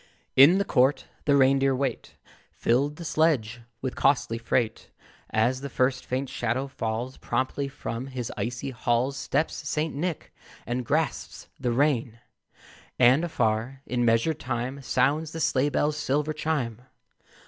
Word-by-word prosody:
In 145 +8 +8
the 200 - +1
court 135 -2 +2 0.2
the 140 - +4
reindeer 135 0 +4
wait; 130 -2 -3 0.4
Filled 140 +5 +1
the 170 - -8
sledge 130 -9 +1 0.2
with 130 - -2
costly 135 -4 +2
freight. 115 -1 -1 0.4
As 120 +4 +1
the 140 - -5
first 130 0 0
faint 130 +2 -2
shadow 120 +2 -2
falls, 120 -1 -4
Promptly 130 +3 -2
from 130 -2 -5
his 130 -3 -5
icy 120 +3 -3
halls 120 +2 0
Steps 145 +3 -1 0.2
St. 155 +1 -1
Nick, 165 +3 -4 0.3
and 125 +2 -2
grasps 155 +1 -2
the 125 -3 0
rein: 120 -3 +1 0.8
And 130 +5 +5
afar, 125 -3 -1
in 120 0 -1
measured 120 +7 +2
time, 130 +2 -3
Sounds 145 +5 +1
the 165 - -5
sleigh 140 -2 +2
bells' 150 +1 0
silver 150 +2 0
chime. 130 -8 -2
130 Hz, 140 wpm, -26 LUFS, 120-145 Hz, 0.8 s, In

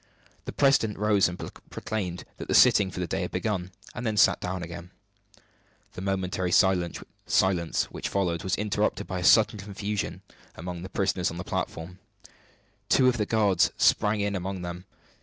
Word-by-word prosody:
The - - -4
president 135 -7 +2
rose 105 -1 +3
and 90 0 -6
proclaimed 90 -5 -6
that - - -7
the - - +1
sitting 95 - +6
for 90 - -7
the 90 - -1
day 95 +3 -2
had 90 - -3
begun; 90 -1 -2 0.2
then 115 -3 -3
sat - - +4
down 90 0 -3
again. 85 +1 -8 1.0
The - - -7
momentary 95 -2 -2
silence 90 -1 +1
which - - -4
followed 90 -4 -1
was 95 - 0
interrupted 105 0 -1
by 95 -1 -4
a - - -4
sudden 105 +5 +5
confusion 100 +1 -4 0.3
among 90 +1 -6
the 95 - -7
prisoners 95 -2 0
on 85 - -7
the 85 - -4
platform. 90 +1 -5 0.9
Two 130 - +5
of 120 - -1
the 105 -2 -1
guards 105 -4 +3
sprang 105 0 +3
in 100 0 -1
among 95 0 -4
them. 90 +1 -6
95 Hz, 165 wpm, -27 LUFS, 90-105 Hz, 1.0 s, sitting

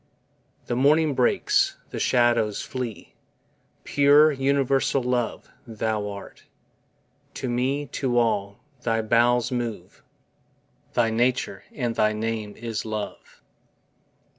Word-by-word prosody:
The 120 - -2
morning 150 +4 +3
breaks, 400 - +2
the - - -4
shadows 120 -4 +2
flee: 125 -4 -6 0.7
Pure 145 +2 +5
UNIVERSAL 135 -1 +1
LOVE 125 -2 -2 0.2
Thou 110 -2 -2
art, 100 -1 -10 0.9
To 130 - -4
me, 130 +4 -1
to 130 -4 -2
all, 100 -4 +1 0.2
thy 115 -2 0
bowels 120 +2 +2
move, 115 -7 -4 0.9
Thy 115 -2 +2
nature, 125 +3 0
and 120 -4 -2
thy 110 -1 +2
name 110 -1 -3
is 115 -1 -4
LOVE. 110 -1 -7
120 Hz, 105 wpm, -24 LUFS, 110-135 Hz, 0.9 s, Pure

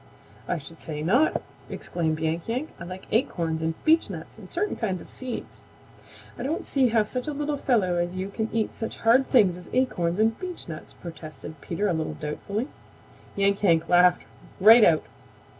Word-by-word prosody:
"I 180 - 0
should 165 +2 -11
say 150 -1 -5
not!" 245 - +3 0.3
exclaimed 160 -3 -2
Yank 160 +1 -2
Yank. 255 +7 -2
"I 170 - -7
like 185 +1 -8
acorns 170 - 0
and 160 0 -1
beechnuts 260 - +1
and 200 -4 -13
certain 410 +4 -1
kinds 190 -6 -2
of - - -11
seeds." 255 -2 -6 0.8
"I - - -4
don't 310 +5 -2
see 270 -2 +3
how 225 -2 +3
such 250 +5 -4
a 300 - -2
little 295 +1 -1
fellow 210 -11 +1
as 175 +1 -1
you 190 +1 -3
can 220 +2 -3
eat 225 -1 -1
such 225 - -5
hard 250 +4 +5
things 195 -8 +4
as 180 - -12
acorns 180 -10 +1
and 220 +1 +2
beechnuts," 335 - -7
protested 160 -2 -9
Peter 180 +7 -1
a 185 - +1
little 160 -1 -2
doubtfully. 200 - -4 0.7
Yank 200 0 +2
Yank 165 -4 +3
laughed 180 0 +5 0.4
right 220 +4 +9
out. 160 -5 +5
195 Hz, 175 wpm, -26 LUFS, 165-240 Hz, 0.8 s, right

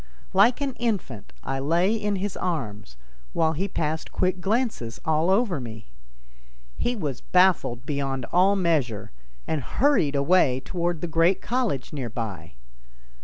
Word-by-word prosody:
Like 225 +8 +5
an 275 -2 -1
infant 195 - -2
I 135 - -2
lay 170 +8 +2
in 210 -2 -1
his 195 0 -3
arms, 110 - -4 0.4
while 160 0 +2
he 185 +6 -1
passed 160 -3 -3
quick 185 0 0
glances 205 - -1
all 160 +2 +2
over 195 - +2
me. 115 -3 -9 0.9
He 245 - -1
was 145 - -4
baffled 180 -10 +2
beyond 135 -3 -2
all 190 +3 +4
measure, 155 - 0 0.3
and 155 -2 -1
hurried 175 - +2
away 140 -3 +3
toward 175 +1 -2
the 175 - -2
great 165 +3 +3
college 225 - -2
near 130 -5 -3
by. 100 -8 -6
165 Hz, 140 wpm, -25 LUFS, 135-195 Hz, 0.9 s, Like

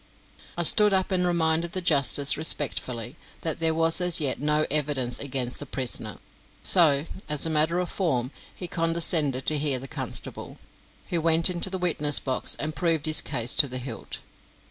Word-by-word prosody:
I 175 - -1
stood 210 +4 +4
up 190 +1 -1
and 180 -1 0
reminded 165 -1 0
the 185 - -2
justice 145 -3 +3
respectfully 130 -4 -1 0.2
that 160 - -4
there 160 -1 0
was 165 +2 +1
as 180 -1 +4
yet 145 -4 -1
no 150 +1 0
evidence 140 -5 -1
against 130 -3 -3
the 145 - -9
prisoner, 125 -5 -1 0.5
so, 155 -5 +4 0.2
as 150 0 +2
a 160 - -2
matter 160 +3 +2
of 180 0 -3
form, 135 -11 -3 0.2
he 180 - -7
condescended 165 -5 +1
to 155 -1 0
hear 140 -3 0
the 135 +2 -9
constable, - - -4 0.5
who 170 -2 -1
went 165 +2 +2
into 175 +1 +1
the 190 - -5
witness 150 -5 +3
box 130 -2 -2
and 155 +1 -6
proved 165 -4 -1
his 155 0 +1
case 125 -3 0
to 145 - +4
the 130 -1 -5
hilt. 125 -2 -8
155 Hz, 175 wpm, -24 LUFS, 140-170 Hz, 0.5 s, stood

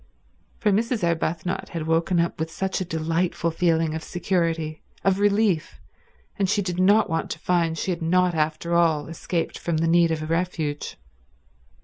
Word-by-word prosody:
For 210 - +1
Mrs. 225 +1 0
Arbuthnot 170 +1 -1
had 165 -3 -4
woken 165 +2 +1
up 170 -1 0
with 160 0 -2
such 190 +3 -2
a - - -1
delightful 165 +1 -1
feeling 165 -2 +1
of 160 - -3
security, 165 -3 -1 0.2
of 195 0 +2
relief, 205 -5 +1 0.6
and 195 -2 +2
she 205 0 +1
did 180 -1 -3
not 205 +4 +5
want 165 -1 -2
to - - -4
find 170 -2 0
she 185 - -1
had 170 - -3
not 180 +2 +2
after 155 +2 -1
all 165 -4 +3
escaped 165 +1 -3
from 170 -2 -1
the 165 +1 +1
need 170 0 +4
of 155 -1 -2
refuge. 165 -3 -2
170 Hz, 165 wpm, -24 LUFS, 160-185 Hz, 0.6 s, not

